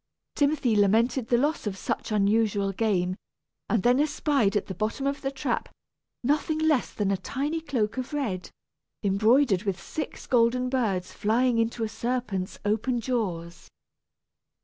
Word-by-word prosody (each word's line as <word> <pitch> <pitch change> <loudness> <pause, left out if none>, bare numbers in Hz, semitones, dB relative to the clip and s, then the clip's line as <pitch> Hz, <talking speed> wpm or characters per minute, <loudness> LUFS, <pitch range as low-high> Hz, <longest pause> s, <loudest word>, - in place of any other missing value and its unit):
Timothy 285 -6 +2
lamented 225 +5 +3
the 240 - +3
loss 290 -2 0
of 195 -2 -3
such 220 - -3
unusual 205 -1 +2
game, 185 -3 0 0.5
and 225 -5 +1
then 245 +2 +4
espied 285 -8 +2
at 205 - -2
the 190 - -5
bottom 215 +8 -2
of 280 +1 -1
the 270 - -1
trap 270 -3 -2 0.5
nothing 300 +4 +1
less 310 -5 +2
than 200 -2 -1
a 195 - +1
tiny 280 - -3
cloak 255 -8 -1
of 255 +2 -4
red, 230 -12 -2 0.5
embroidered 215 +1 +3
with 195 -4 -2
six 305 - -6
golden 250 +1 +2
birds 215 -9 -1
flying 235 +3 +2
into 230 0 0
a - - 0
serpent's 220 -4 -3
open 220 +4 +1
jaws! 185 -9 -3
230 Hz, 150 wpm, -27 LUFS, 200-265 Hz, 0.5 s, then